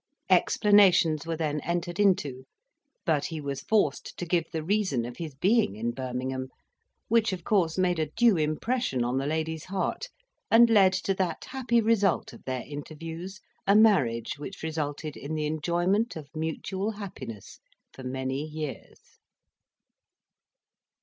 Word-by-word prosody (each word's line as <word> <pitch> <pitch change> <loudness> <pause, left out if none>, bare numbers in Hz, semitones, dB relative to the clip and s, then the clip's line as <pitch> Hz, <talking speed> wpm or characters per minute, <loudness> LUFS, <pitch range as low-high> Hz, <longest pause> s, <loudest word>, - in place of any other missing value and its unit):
Explanations 185 -7 +4
were 165 -1 -2
then 150 -2 -1
entered 175 +2 -3
into; 145 -10 +2 0.6
but 150 -4 +1
he 160 - -4
was 140 -2 -4
forced 215 +6 0
to 175 - -4
give 170 -1 0
the 160 -1 -4
reason 185 - 0
of 120 0 -8
his 160 -5 -6
being 195 - +2
in 115 +2 -2
Birmingham, 130 +1 -4 0.6
which 225 -1 +3
of 180 -3 -5
course 175 -5 +1
made 180 -2 +2
a 155 - 0
due 230 +4 +4
impression 155 - 0
on 125 +2 0
the 135 - -2
lady's 160 0 -2
heart, 195 - -2 0.4
and 230 +1 +7
led 195 -4 +6
to 195 +1 0
that 185 -3 -2
happy 240 -3 +1
result 210 -4 +2
of - - -14
their 130 -2 -3
interviews 165 +6 -7 0.3
a 200 - +5
marriage 145 - +3
which 155 +5 -8
resulted 155 -1 -3
in 145 +3 -5
the 155 -1 -1
enjoyment 175 +8 0
of 155 -3 -8
mutual 190 +6 -3
happiness 130 - -8 0.3
for - - -11
many 130 +1 -3
years. 155 -2 -8
160 Hz, 145 wpm, -28 LUFS, 145-195 Hz, 0.6 s, and